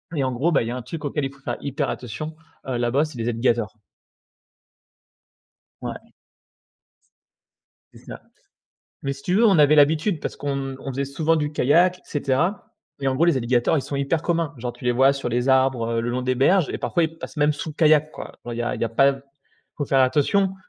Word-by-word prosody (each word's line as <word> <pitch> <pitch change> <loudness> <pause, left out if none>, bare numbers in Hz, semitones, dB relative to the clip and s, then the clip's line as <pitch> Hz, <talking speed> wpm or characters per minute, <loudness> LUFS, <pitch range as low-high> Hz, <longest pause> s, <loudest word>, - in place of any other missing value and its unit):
Et 140 - 0
en 130 - 0
gros, 140 +8 0
bah, 140 - +3
il 115 - -5
y - - -3
un 125 0 -4
truc 160 +4 -7
auquel 145 0 -1
il 135 - -4
faut 140 - -20
faire - - -4
hyper 140 +1 -2
attention, 155 +7 -6 0.3
heu, 125 - -1
là-bas, 120 +5 +1
c'est 155 -5 -10
les 115 +1 -2
alligators. 115 -3 0 2.1
Ouais. - - -7 1.8
C'est - - -15
ça. - - -9 0.8
Mais 140 - -1
si 140 - -11
tu 180 - -1
veux, 225 +3 +5
on 195 -5 +4
avait 150 0 +6
l'habitude 155 +4 +3
parce - - -5
qu'on 135 -2 -3
on - - -8
faisait 140 +2 -2
souvent 155 +4 0
du 150 -1 -1
kayak 175 +7 +3
et - - -24
cetera. 150 +7 -1 0.3
Et 135 - 0
en 130 - 0
gros, 150 +6 +2
les 170 -4 +3
alligators, 120 +4 +1
ils - - +1
sont 140 - -5
hyper 140 +4 0
communs. 165 -4 -1
Genre 120 +1 -4
tu - - -14
les 125 - +2
vois 135 +3 +4
sur 135 -3 -4
les 120 +2 -1
arbres, 130 -3 +3
heu, - - +2
le 120 +1 -2
long 125 +1 -2
des 130 0 0
berges 160 +7 +3
et - - -4
parfois 175 - 0
ils 160 +1 -5
passent - - -9
même 150 0 +3
sous 150 +2 -6
le - - -11
kayak 155 -1 +4
quoi. - - -10
Genre 120 - -5
il - - -6
y - - -1
a 120 - -2
pas - - -3
il - - 0
a 115 - -1
pas 135 +4 +2 0.6
faut 145 - -2
faire 135 -1 +2
attention, 185 +9 +2
140 Hz, 230 wpm, -23 LUFS, 125-155 Hz, 2.1 s, avait